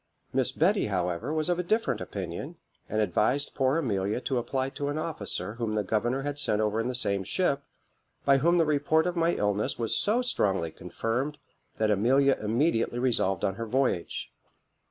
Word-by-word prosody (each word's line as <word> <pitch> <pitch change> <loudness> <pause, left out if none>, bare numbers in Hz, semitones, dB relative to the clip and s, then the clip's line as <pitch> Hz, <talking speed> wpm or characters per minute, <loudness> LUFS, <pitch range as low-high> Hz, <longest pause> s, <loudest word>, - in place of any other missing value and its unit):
Miss 130 -1 +2
Betty, 195 - +2
however, 90 - -1
was 155 -1 0
of 175 0 +1
a - - 0
different 220 +6 0
opinion, - - -5 0.3
and 110 - -1
advised 110 +7 +1
poor 135 +2 +2
Amelia 105 -8 0
to 130 -1 0
apply 130 +2 -2
to 140 - -4
an 145 +1 -2
officer 105 - -3
whom 115 -2 -3
the 105 - +1
governor 120 +6 0
had 145 0 -3
sent 105 -6 +1
over 110 0 +1
in 115 - -1
the 125 - -2
same 100 -5 +2
ship, 140 - 0 0.6
by 140 -1 +5
whom 170 +5 +3
the 165 - +4
report 150 +2 +2
of 180 0 -1
my 170 0 +2
illness 105 0 0
was 115 -2 -1
so 230 +5 +2
strongly 95 - 0
confirmed, 115 - -3 0.4
that 110 -1 +1
Amelia 130 +7 +4
immediately 115 +2 +1
resolved 115 -7 +1
on 95 - 0
her 115 +4 -5
voyage. 125 -8 -1
125 Hz, 180 wpm, -28 LUFS, 105-145 Hz, 0.6 s, by